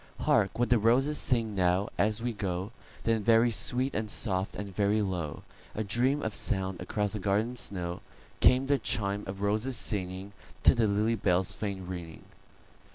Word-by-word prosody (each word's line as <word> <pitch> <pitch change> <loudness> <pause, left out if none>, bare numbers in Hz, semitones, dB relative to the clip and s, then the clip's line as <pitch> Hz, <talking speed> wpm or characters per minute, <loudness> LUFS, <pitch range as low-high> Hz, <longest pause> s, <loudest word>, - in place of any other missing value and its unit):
"Hark 95 - +2
what 120 +1 +1
the 120 -2 +4
roses 130 +7 +2
sing 115 -4 0
now, 90 +1 +1
as 105 +2 0
we 120 -1 -1
go;"Then 105 +3 -3
very 115 +2 +4
sweet 125 +4 +1
and 110 +1 -2
soft, 95 -2 0
and 100 -2 -7
very 105 +2 +2
low,—A 95 +2 -5
dream 125 +8 +1
of 110 - -2
sound 95 -4 0
across 105 +2 -2
the 105 - -3
garden 105 +5 0
snow,—Came 100 +6 0
the 140 0 +2
chime 100 -2 -1
of 95 +1 -6
roses 110 +5 0
singingTo 95 -1 -1
the 115 -2 +2
lily 105 +3 +1
bell's 95 -4 +1
faint 95 -3 -5
ringing. 85 -3 -7
105 Hz, 155 wpm, -29 LUFS, 95-115 Hz, -, the